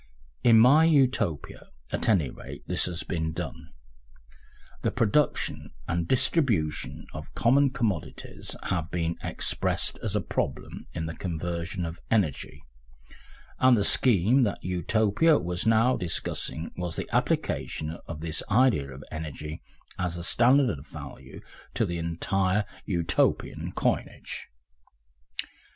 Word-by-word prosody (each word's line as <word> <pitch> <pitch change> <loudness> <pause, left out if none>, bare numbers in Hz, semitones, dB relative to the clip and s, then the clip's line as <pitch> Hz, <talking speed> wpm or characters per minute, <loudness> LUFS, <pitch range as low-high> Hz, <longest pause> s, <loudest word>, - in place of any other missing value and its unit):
In 115 -2 +7
my 135 +8 +7
Utopia, 130 - +1 0.2
at - - -1
any 85 - +3
rate, - - -10
this - - +1
has 85 -2 -3
been 80 -2 -2
done, - - -6 1.1
the - - +1
production 125 +4 +1 0.2
and 85 0 -1
distribution 80 - +1
of - - -8
common 135 +4 +4
commodities 115 - -3
have 85 -3 -2
been 85 -1 -1
expressed - - 0
as - - -2
a - - +3
problem - - -4
in 80 -1 -2
the 80 - -4
conversion 85 +1 -3
of 85 +1 -6
energy, 95 -11 0 1.0
and 130 -2 +6
the 100 - +2
scheme 115 +3 +4
that 105 -5 0
Utopia 105 - +2
was 90 +3 -2
now 115 +3 +4
discussing 85 -2 -1
was 90 -2 -4
the - - -4
application 80 +2 -1
of 80 -2 -6
this 80 -1 -2
idea 110 - +3
of 65 +2 -10
energy 75 0 -6 0.4
as 90 -2 -1
the 85 - -5
standard 120 - +3
of 70 - -14
value 65 -1 -10 0.3
to - - +2
the 85 0 -3
entire 95 +4 0 0.2
Utopian 85 -4 0
coinage. - - -2
90 Hz, 125 wpm, -27 LUFS, 80-115 Hz, 1.1 s, In